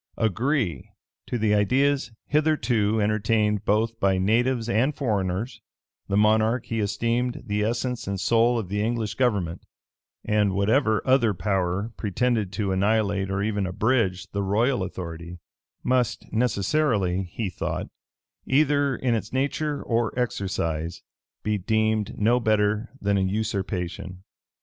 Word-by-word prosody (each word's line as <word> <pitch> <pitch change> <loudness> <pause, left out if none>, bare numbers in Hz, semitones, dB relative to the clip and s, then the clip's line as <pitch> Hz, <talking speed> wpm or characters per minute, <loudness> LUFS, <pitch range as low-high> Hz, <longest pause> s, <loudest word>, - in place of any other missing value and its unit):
Agree 110 - 0 0.2
* - - -61
to 120 - -2
the 110 -2 +2
ideas 135 +7 +2
hitherto 125 -8 +1
entertained 105 0 +1
both 110 +2 +1
by 95 -1 +2
natives 115 +5 +1
and 120 +6 +1
foreigners, 105 -2 -2 0.5
the 100 - 0
monarch 110 +3 +3
he 115 - -3
esteemed 115 +4 -1
the 105 -2 -1
essence 120 +1 -2
and 100 -1 -2
soul 115 +4 +3
of 110 -5 -3
the 105 +2 -2
English 110 -1 -1
government: 100 -10 0 0.6
and 105 -2 +2
whatever 110 +3 +2
other 125 -6 +3
power 95 +2 -1
pretended 110 -1 0
to 100 0 -2
annihilate 100 0 +1
or 95 +1 -1
even 105 -2 -1
abridge, 95 -2 +1
the 100 - -2
royal 110 +5 +1
authority, 85 -2 -6 0.5
must 125 -2 0
necessarily, 110 -4 +1
he 110 +3 -3
thought, 90 - -3 0.6
either 145 -1 +3
in 125 -1 0
its 110 -2 -2
nature 145 +2 -1
or 115 0 -1
exercise, 85 -8 -2 0.4
be 105 -1 0
deemed 110 +1 0
no 115 +4 +3
better 110 0 +1
than 100 -1 +1
a - - +1
usurpation. 95 -2 -3
110 Hz, 130 wpm, -25 LUFS, 100-120 Hz, 0.6 s, monarch